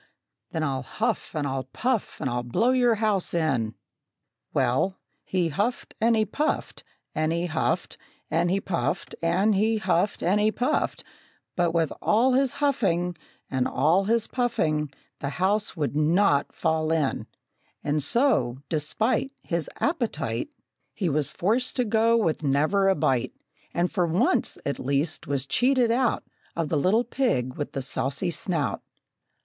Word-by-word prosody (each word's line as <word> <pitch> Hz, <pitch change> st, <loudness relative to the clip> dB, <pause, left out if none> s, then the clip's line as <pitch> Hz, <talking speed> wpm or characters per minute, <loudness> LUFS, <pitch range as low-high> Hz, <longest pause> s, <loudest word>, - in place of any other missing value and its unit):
Then 160 Hz, -, -2 dB
I'll 135 Hz, -3 st, -1 dB
huff 215 Hz, -, -2 dB
and 150 Hz, -2 st, -1 dB
I'll 135 Hz, -1 st, -2 dB
puff 235 Hz, -, -2 dB
and -, -, -2 dB
I'll 120 Hz, -1 st, -1 dB
blow 125 Hz, -, +1 dB
your 245 Hz, -3 st, +3 dB
house 210 Hz, -5 st, 0 dB
in!" 130 Hz, -10 st, 0 dB, 0.8 s
Well, 130 Hz, +9 st, +1 dB, 0.3 s
he 180 Hz, -3 st, 0 dB
huffed 205 Hz, +10 st, -2 dB
and 230 Hz, +1 st, +4 dB
he 215 Hz, -1 st, +2 dB
puffed 295 Hz, +9 st, -2 dB, 0.3 s
and 155 Hz, +1 st, 0 dB
he 170 Hz, +1 st, 0 dB
huffed, 160 Hz, -2 st, -1 dB, 0.3 s
And 170 Hz, +2 st, +2 dB
he 195 Hz, +2 st, +2 dB
puffed 185 Hz, -3 st, -2 dB
and 185 Hz, +6 st, +2 dB
he 220 Hz, +3 st, +2 dB
huffed 205 Hz, -1 st, 0 dB
and 195 Hz, +4 st, +3 dB
he 215 Hz, +1 st, +3 dB
puffed, 245 Hz, +3 st, -1 dB, 0.5 s
But 175 Hz, -1 st, +1 dB
with 165 Hz, -3 st, +1 dB
all 245 Hz, +5 st, +3 dB
his 265 Hz, 0 st, +2 dB
huffing, 195 Hz, -12 st, +1 dB, 0.4 s
And 130 Hz, -2 st, +1 dB
all 180 Hz, +5 st, +2 dB
his 225 Hz, +1 st, +2 dB
puffing, 155 Hz, -, 0 dB, 0.3 s
The 140 Hz, -, -3 dB
house 200 Hz, +2 st, +1 dB
would 145 Hz, -2 st, -1 dB
not 155 Hz, 0 st, +3 dB
fall 160 Hz, 0 st, 0 dB
in! 155 Hz, -4 st, 0 dB, 0.6 s
And 150 Hz, +1 st, +1 dB
so, 205 Hz, -, +2 dB
despite 215 Hz, -, 0 dB
His 170 Hz, -3 st, -2 dB
appetite, 220 Hz, -, -1 dB, 0.5 s
He 185 Hz, -5 st, 0 dB
was 150 Hz, 0 st, +1 dB
forced 230 Hz, +8 st, 0 dB
to 250 Hz, -, +1 dB
go 225 Hz, +1 st, +3 dB
with 165 Hz, -9 st, 0 dB
never 155 Hz, +8 st, +2 dB
a 190 Hz, -, +3 dB
bite, 130 Hz, -3 st, 0 dB, 0.4 s
And 175 Hz, +1 st, 0 dB
for 180 Hz, -4 st, +1 dB
once, 165 Hz, +3 st, +1 dB
at 140 Hz, -, -2 dB
least, 140 Hz, +4 st, -1 dB
was 140 Hz, -2 st, -1 dB
cheated 245 Hz, -, +2 dB
out 245 Hz, 0 st, +1 dB, 0.3 s
Of 165 Hz, -3 st, -1 dB
the -, -, 0 dB
little 195 Hz, +10 st, +3 dB
pig 230 Hz, -, 0 dB
with 145 Hz, +1 st, -5 dB
the 135 Hz, -, -3 dB
saucy 140 Hz, +6 st, -1 dB
snout. 150 Hz, -, -1 dB
175 Hz, 155 wpm, -26 LUFS, 150-220 Hz, 0.8 s, and